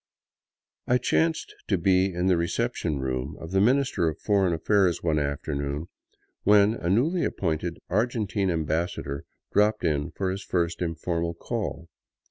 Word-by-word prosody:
I 125 Hz, -, +4 dB
chanced 160 Hz, +5 st, 0 dB
to 100 Hz, -, +2 dB
be 95 Hz, +2 st, +3 dB
in 90 Hz, +1 st, -2 dB
the 95 Hz, -1 st, +4 dB
reception 85 Hz, -2 st, -1 dB
room 65 Hz, +2 st, -3 dB
of 80 Hz, -, -8 dB
the 95 Hz, 0 st, +3 dB
Minister 125 Hz, -7 st, +2 dB
of 80 Hz, -, -6 dB
Foreign 100 Hz, -4 st, +2 dB
Affairs 90 Hz, +2 st, +2 dB
one 80 Hz, -3 st, +2 dB
afternoon 70 Hz, +2 st, -3 dB, 0.5 s
when 105 Hz, +1 st, +5 dB
a 85 Hz, -6 st, -3 dB
newly 155 Hz, -, +2 dB
appointed 85 Hz, -1 st, -1 dB
Argentine 105 Hz, -2 st, 0 dB
ambassador 80 Hz, -3 st, -2 dB, 0.3 s
dropped 105 Hz, +1 st, +3 dB
in 75 Hz, -2 st, 0 dB
for 95 Hz, -2 st, -2 dB
his 100 Hz, +2 st, -5 dB
first 85 Hz, -1 st, -1 dB
informal 85 Hz, 0 st, -2 dB
call. 100 Hz, -4 st, -4 dB
90 Hz, 140 wpm, -26 LUFS, 80-105 Hz, 0.5 s, when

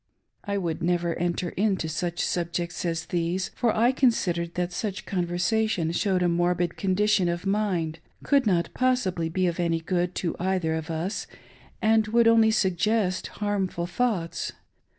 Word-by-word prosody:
I 200 Hz, -1 st, -2 dB
would 170 Hz, -3 st, -2 dB
never 175 Hz, 0 st, +1 dB
enter 175 Hz, 0 st, -1 dB
into 195 Hz, -4 st, 0 dB
such 170 Hz, +2 st, -2 dB
subjects 175 Hz, 0 st, -2 dB
as 165 Hz, -1 st, -1 dB
these, 175 Hz, +2 st, -1 dB
for 235 Hz, -, 0 dB
I 235 Hz, +4 st, +3 dB
con 260 Hz, -1 st, +4 dB
sidered 170 Hz, -6 st, -2 dB
that 180 Hz, 0 st, -2 dB
such 200 Hz, +1 st, -4 dB
conversation 180 Hz, 0 st, 0 dB
showed 185 Hz, +1 st, +1 dB
a -, -, +3 dB
morbid 175 Hz, 0 st, +1 dB
condition 195 Hz, -1 st, +2 dB
of 170 Hz, +2 st, -3 dB
mind, 185 Hz, -6 st, 0 dB, 0.2 s
could 275 Hz, -5 st, +3 dB
not 175 Hz, -4 st, +1 dB
possibly 205 Hz, -10 st, +1 dB
be 185 Hz, +3 st, 0 dB
of 175 Hz, 0 st, -1 dB
any 170 Hz, -1 st, +1 dB
good 175 Hz, +1 st, -1 dB
to 170 Hz, -, -2 dB
either 180 Hz, -3 st, 0 dB
of 160 Hz, 0 st, -4 dB
us, 165 Hz, +5 st, -3 dB, 0.6 s
and 220 Hz, 0 st, +4 dB
would 230 Hz, +1 st, +4 dB
only 225 Hz, -1 st, +6 dB
suggest 200 Hz, -1 st, +1 dB
harmful 195 Hz, -4 st, -2 dB
thoughts. 185 Hz, -3 st, -1 dB
180 Hz, 155 wpm, -26 LUFS, 170-210 Hz, 0.6 s, only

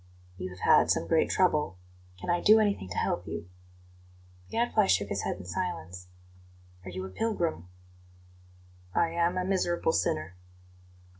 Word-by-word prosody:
"You 90 Hz, -, -4 dB
have 90 Hz, 0 st, -12 dB
had -, -, +5 dB
some -, -, +2 dB
great 160 Hz, -, +3 dB
trouble. 150 Hz, -, +1 dB, 0.4 s
Can 180 Hz, -, -2 dB
I 175 Hz, -, +1 dB
do 215 Hz, +1 st, +7 dB
anything 200 Hz, -, 0 dB
to 90 Hz, -, -6 dB
help 90 Hz, -, -1 dB
you?" 85 Hz, +1 st, -5 dB, 1.0 s
The -, -, -18 dB
Gadfly 225 Hz, -3 st, +2 dB
shook 100 Hz, +2 st, +2 dB
his 100 Hz, -, -1 dB
head -, -, -2 dB
in 90 Hz, -, -10 dB
silence. 90 Hz, -, -4 dB, 0.8 s
"Are 95 Hz, -, -8 dB
you 95 Hz, +1 st, -5 dB
a -, -, -7 dB
pilgrim?" 170 Hz, -, -2 dB, 1.3 s
"I 170 Hz, -, +3 dB
am 170 Hz, +2 st, +1 dB
a 180 Hz, -, 0 dB
miserable 175 Hz, -3 st, +1 dB
sinner." 155 Hz, -, -1 dB
160 Hz, 155 wpm, -29 LUFS, -, 1.3 s, do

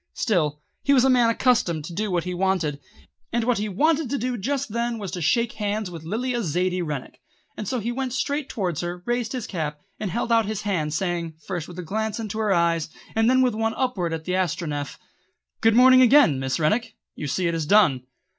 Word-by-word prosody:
Still, 155 Hz, -9 st, 0 dB, 0.2 s
he 280 Hz, -, +3 dB
was 260 Hz, -1 st, +5 dB
a 265 Hz, -, +5 dB
man 245 Hz, -2 st, +4 dB
accustomed 220 Hz, -, +1 dB
to 170 Hz, -, -7 dB
do 210 Hz, +4 st, -2 dB
what 175 Hz, -3 st, 0 dB
he 180 Hz, -, -4 dB
wanted: 180 Hz, -6 st, 0 dB, 0.5 s
and 235 Hz, -1 st, 0 dB
what 240 Hz, -2 st, +1 dB
he 210 Hz, +1 st, -2 dB
wanted 305 Hz, -, +1 dB
to 280 Hz, -, -1 dB
do 250 Hz, 0 st, -2 dB
just 270 Hz, +4 st, -2 dB
then 235 Hz, +2 st, -2 dB
was 200 Hz, -4 st, -5 dB
to 180 Hz, -1 st, -4 dB
shake 230 Hz, +10 st, +2 dB
hands 210 Hz, -2 st, -3 dB
with 165 Hz, -2 st, -8 dB
Lilla 240 Hz, +7 st, -2 dB
Zaidie 180 Hz, +2 st, 0 dB
Rennick, 150 Hz, -6 st, -5 dB, 0.3 s
and 210 Hz, -, -6 dB
so 255 Hz, -, -1 dB
he 230 Hz, +2 st, -2 dB
went 260 Hz, +1 st, -3 dB
straight 280 Hz, +2 st, -2 dB
towards 180 Hz, -7 st, -2 dB
her, 175 Hz, +1 st, -5 dB
raised 240 Hz, -1 st, -1 dB
his 250 Hz, -4 st, -3 dB
cap, 150 Hz, -5 st, -4 dB, 0.2 s
and 210 Hz, -, -2 dB
held 235 Hz, +5 st, -2 dB
out 225 Hz, -2 st, +4 dB
his 215 Hz, -1 st, -3 dB
hand 160 Hz, -7 st, -1 dB
saying, 170 Hz, -2 st, -2 dB
first 175 Hz, -5 st, -4 dB
with 175 Hz, -, -11 dB
a 180 Hz, -, -5 dB
glance 220 Hz, +6 st, -2 dB
into 220 Hz, -1 st, -4 dB
her 215 Hz, -2 st, +1 dB
eyes, 170 Hz, -3 st, +2 dB, 0.2 s
and 225 Hz, +1 st, +3 dB
then 260 Hz, 0 st, +4 dB
with 250 Hz, -3 st, +2 dB
one 225 Hz, +1 st, -1 dB
upward 210 Hz, -10 st, -1 dB
at 160 Hz, -1 st, -4 dB
the 180 Hz, -, -2 dB
Astronef: 155 Hz, -5 st, -2 dB, 0.6 s
"Good 225 Hz, -1 st, +4 dB
morning 255 Hz, +1 st, +7 dB
again, 250 Hz, -, +6 dB
Miss 130 Hz, -1 st, -1 dB
Rennick! 225 Hz, +9 st, 0 dB, 0.2 s
You 150 Hz, -, -5 dB
see 180 Hz, +6 st, -1 dB
it 170 Hz, -, 0 dB
is 160 Hz, -2 st, -2 dB
done." 185 Hz, -11 st, +5 dB
205 Hz, 220 wpm, -24 LUFS, 170-240 Hz, 0.6 s, morning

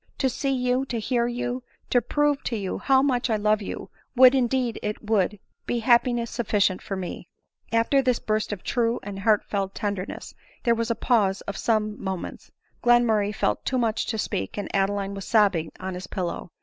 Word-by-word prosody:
To 265 Hz, -, +2 dB
see 275 Hz, +3 st, -2 dB
you, 250 Hz, 0 st, +1 dB
to 240 Hz, -3 st, -3 dB
hear 235 Hz, +2 st, 0 dB
you, 245 Hz, +1 st, -3 dB, 0.3 s
to 245 Hz, -, +4 dB
prove 290 Hz, +4 st, +1 dB
to 235 Hz, -, -1 dB
you 195 Hz, -3 st, -3 dB
how 265 Hz, -1 st, +4 dB
much 255 Hz, -3 st, +1 dB
I 220 Hz, -, +2 dB
love 215 Hz, 0 st, +2 dB
you, 200 Hz, -, -6 dB, 0.2 s
would, 255 Hz, +1 st, +8 dB
indeed 250 Hz, -2 st, +1 dB
it 210 Hz, 0 st, -4 dB
would, 210 Hz, -2 st, +2 dB, 0.3 s
be 235 Hz, -2 st, -1 dB
happi 240 Hz, +1 st, +4 dB
ness 235 Hz, -1 st, -3 dB
sufficient 205 Hz, -5 st, +1 dB
for 195 Hz, -, -4 dB
me 185 Hz, -2 st, -6 dB, 0.2 s
!" -, -, -63 dB
After 230 Hz, +5 st, +3 dB
this 250 Hz, -2 st, +2 dB
burst 215 Hz, 0 st, -1 dB
of 205 Hz, -4 st, -5 dB
true 235 Hz, -1 st, 0 dB
and 200 Hz, -1 st, -6 dB
heartfelt 200 Hz, -2 st, +1 dB
tenderness, 200 Hz, -2 st, -4 dB, 0.3 s
there 235 Hz, -, +4 dB
was 230 Hz, 0 st, -1 dB
a 230 Hz, -, +1 dB
pause 210 Hz, -5 st, +2 dB
of 200 Hz, -, -6 dB
some 215 Hz, -1 st, 0 dB
mo 190 Hz, -1 st, -1 dB
ments; -, -, -9 dB, 0.3 s
Glenmurray 225 Hz, -4 st, +3 dB
felt 105 Hz, -, 0 dB
too 260 Hz, -, 0 dB
much 230 Hz, -3 st, 0 dB
to 225 Hz, -, -2 dB
speak, 95 Hz, -, -3 dB
and 205 Hz, -, -4 dB
Adeline 195 Hz, 0 st, 0 dB
was 195 Hz, -1 st, -6 dB
sobbing 195 Hz, -8 st, +2 dB
on 190 Hz, 0 st, -4 dB
his 180 Hz, 0 st, -7 dB
pillow. 180 Hz, -1 st, -4 dB
220 Hz, 200 wpm, -25 LUFS, 200-245 Hz, 0.3 s, would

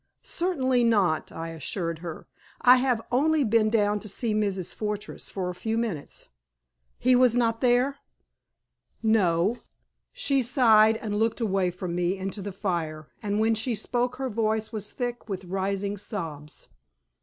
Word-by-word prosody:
"Certainly 260 Hz, -9 st, +1 dB
not," 200 Hz, -9 st, +2 dB
I 165 Hz, 0 st, -6 dB
assured 165 Hz, +1 st, -3 dB
her. 165 Hz, -2 st, -7 dB, 0.3 s
"I 250 Hz, +1 st, +7 dB
have 250 Hz, -3 st, +1 dB
only 300 Hz, +4 st, +3 dB
been 220 Hz, -2 st, +3 dB
down 210 Hz, -2 st, +2 dB
to 215 Hz, -, -8 dB
see 220 Hz, +3 st, -2 dB
Mrs. 200 Hz, -4 st, -1 dB
Fortress 210 Hz, 0 st, -5 dB
for 185 Hz, -2 st, -3 dB
a 180 Hz, -, -3 dB
few 220 Hz, +5 st, -2 dB
minutes." 210 Hz, -11 st, -4 dB, 0.7 s
"He 255 Hz, 0 st, +4 dB
was 250 Hz, -1 st, +5 dB
not 230 Hz, -1 st, +1 dB
there?" 255 Hz, +3 st, +3 dB, 1.1 s
"No." 205 Hz, -1 st, +2 dB, 0.5 s
She 285 Hz, -, +1 dB
sighed 225 Hz, -3 st, +5 dB
and 210 Hz, -2 st, -4 dB
looked 225 Hz, +2 st, +1 dB
away 195 Hz, -5 st, +1 dB
from 180 Hz, 0 st, -5 dB
me 175 Hz, +2 st, 0 dB
into 195 Hz, +2 st, -4 dB
the 200 Hz, +1 st, -5 dB
fire, 165 Hz, -, -3 dB
and 205 Hz, 0 st, -1 dB
when 225 Hz, +1 st, +3 dB
she 225 Hz, +2 st, -1 dB
spoke 245 Hz, +3 st, -1 dB
her 265 Hz, 0 st, -3 dB
voice 220 Hz, 0 st, 0 dB
was 210 Hz, -2 st, -4 dB
thick 240 Hz, -2 st, -4 dB
with 190 Hz, -2 st, -4 dB
rising 195 Hz, +2 st, -2 dB
sobs. 160 Hz, -8 st, -6 dB
215 Hz, 155 wpm, -26 LUFS, 190-240 Hz, 1.1 s, I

